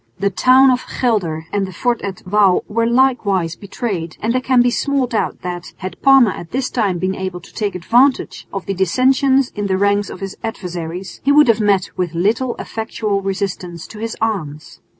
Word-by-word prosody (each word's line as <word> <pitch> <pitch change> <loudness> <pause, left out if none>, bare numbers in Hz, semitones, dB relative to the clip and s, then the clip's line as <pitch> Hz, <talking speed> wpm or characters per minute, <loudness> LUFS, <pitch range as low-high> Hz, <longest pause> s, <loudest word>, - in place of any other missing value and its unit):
The 200 +1 0
town 260 +6 +5
of 250 0 0 0.2
Gelder 180 -10 0
and 200 -1 0
the - - -8
fort 240 +6 -1
at 195 -2 -6
Wouw 195 -1 +3
were 230 +2 0
likewise 225 -9 +2
betrayed, 195 -5 -5
and 225 +2 -1
there 255 - +1
can 255 -1 +3
be 245 - +2
small 280 +1 0
doubt 230 -3 -2
that, 175 0 -6
had 185 0 -7
Parma 270 -6 +6
at 170 -2 -8
this 260 0 -2
time 205 -7 0
been 185 +2 -1
able 190 -2 -4
to 170 - -17
take 205 -3 -2
advantage 245 +9 +1
of 195 -2 -5
the 195 - -2
dissensions 260 - +2
in 205 -1 -3
the 190 -1 +1
ranks 200 0 +1
of - - -8
his 195 -1 -6
adversaries, 180 -4 -6
he 280 - +3
would 295 0 +6
have 230 -1 +3
met 200 -3 +2
with 175 -3 -2
little 225 +8 0
effectual 220 -3 -3
resistance 190 -3 -4
to 210 - -11
his 225 0 -4
arms. 165 -10 -3
205 Hz, 195 wpm, -18 LUFS, 185-245 Hz, 0.2 s, Parma